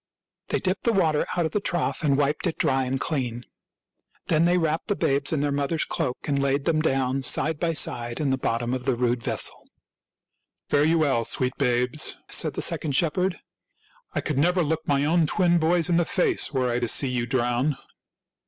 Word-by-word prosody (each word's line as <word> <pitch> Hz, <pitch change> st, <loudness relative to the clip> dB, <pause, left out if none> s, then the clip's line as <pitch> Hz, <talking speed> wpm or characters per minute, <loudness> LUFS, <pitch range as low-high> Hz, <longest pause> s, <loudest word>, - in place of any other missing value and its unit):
They -, -, -1 dB
dipped 185 Hz, 0 st, -2 dB
the 235 Hz, -, +2 dB
water 160 Hz, -6 st, +1 dB
out 175 Hz, -, +1 dB
of 160 Hz, -, -2 dB
the 210 Hz, -, 0 dB
trough 175 Hz, -3 st, -2 dB
and 140 Hz, -3 st, +2 dB
wiped 145 Hz, +5 st, 0 dB
it 165 Hz, -, -3 dB
dry 130 Hz, 0 st, +1 dB
and 130 Hz, +1 st, -2 dB
clean. 125 Hz, -6 st, -3 dB, 0.8 s
Then 160 Hz, +1 st, +3 dB
they 175 Hz, +1 st, +3 dB
wrapped 160 Hz, -1 st, -1 dB
the 205 Hz, -, 0 dB
babes 140 Hz, -3 st, 0 dB
in 155 Hz, -3 st, 0 dB
their 145 Hz, 0 st, 0 dB
mother's 145 Hz, +3 st, -1 dB
cloak 125 Hz, -, -2 dB
and 140 Hz, -2 st, 0 dB
laid 140 Hz, +1 st, 0 dB
them 160 Hz, -2 st, +1 dB
down, 135 Hz, -3 st, 0 dB
side 150 Hz, +3 st, +2 dB
by 170 Hz, -1 st, 0 dB
side, 120 Hz, -6 st, 0 dB
in 145 Hz, -3 st, 0 dB
the -, -, +2 dB
bottom 120 Hz, 0 st, -1 dB
of 130 Hz, -1 st, -3 dB
the 135 Hz, -3 st, +1 dB
rude 120 Hz, 0 st, 0 dB
vessel. -, -, -1 dB, 0.5 s
" -, -, -55 dB
Fare 145 Hz, 0 st, +3 dB
you 165 Hz, +1 st, +3 dB
well, 140 Hz, -7 st, +1 dB
sweet 125 Hz, +3 st, -1 dB
babes," 125 Hz, +2 st, 0 dB
said -, -, +1 dB
the -, -, -1 dB
second 150 Hz, -3 st, 0 dB
shepherd. 175 Hz, +4 st, 0 dB, 0.4 s
" -, -, -31 dB
I -, -, 0 dB
could 145 Hz, -3 st, -2 dB
never 180 Hz, +4 st, +2 dB
look 160 Hz, +1 st, -2 dB
my 140 Hz, 0 st, +1 dB
own 165 Hz, +1 st, +2 dB
twin 175 Hz, -2 st, +2 dB
boys 165 Hz, +1 st, +2 dB
in 175 Hz, -2 st, +2 dB
the 175 Hz, -, +2 dB
face 395 Hz, -, +1 dB
were 130 Hz, -3 st, 0 dB
I 120 Hz, -, 0 dB
to 120 Hz, -, -1 dB
see 135 Hz, +4 st, +3 dB
you 120 Hz, -1 st, -2 dB
drown." 125 Hz, +2 st, 0 dB
145 Hz, 210 wpm, -25 LUFS, 130-165 Hz, 0.8 s, Then